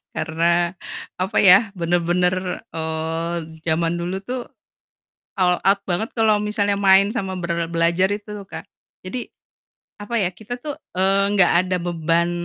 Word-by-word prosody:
karena 170 +2 0 0.4
apa 185 +2 -2
ya, 200 +2 +6
bener-bener, 180 +1 0
eee, 160 +1 -3 0.3
zaman 165 +1 +1
dulu 180 +3 -3
tuh 250 +4 -4 1.0
all 180 -1 +3
out 200 +1 +4
banget 210 +6 -1
kalau 220 -2 +3
misalnya 205 -1 0
main 195 0 +5
sama 195 -4 -3
ber 170 -1 -1
belajar 170 +3 +2
itu 205 -1 -7
Kak, - - -9 0.4
jadi 235 +7 -6 0.7
apa 205 +3 -6
ya, 190 - +1
kita 225 +5 -7
tuh, 295 +3 -5 0.2
eee, 195 +1 +3
nggak 180 -2 +5
ada 185 0 0
beban, 170 0 0
185 Hz, 135 wpm, -21 LUFS, 170-200 Hz, 1.0 s, ya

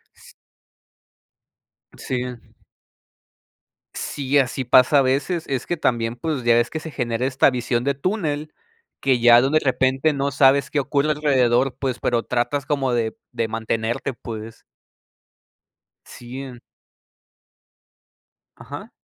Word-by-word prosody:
S - - -18 1.6
Sí. 125 -1 -3 1.7
Sí, 140 0 -1
así 130 -1 +1
pasa 130 +3 +5
a - - +5
veces. 140 +6 0
Es 130 -3 -2
que 175 - -1
también, 120 -5 0
pues, 140 +1 -3
ya 120 0 +4
ves 120 0 +2
que 160 - -4
se 160 0 -8
genera 120 -2 -2
esta 135 +1 +3
visión 120 -1 -1
de 140 +2 +1
túnel, 155 -1 -3 0.5
que 130 -2 +2
ya 120 0 +7
de 140 +4 +2
repente 135 +2 +1
no 140 0 -1
sabes 135 0 +4
qué 145 - 0
ocurre 140 +2 0
alrededor, 130 -4 +2
pues, 130 -3 -3
pero 120 -1 0
tratas 130 +3 -1
como 135 -3 0
de 115 -2 -1
de 115 - -2
mantenerte, 115 +3 -2
pues. 115 -1 -9 1.4
Sí, 125 +2 -9
en 125 -3 -9 2.0
Ajá. - - -9
130 Hz, 125 wpm, -22 LUFS, 120-140 Hz, 2.0 s, ya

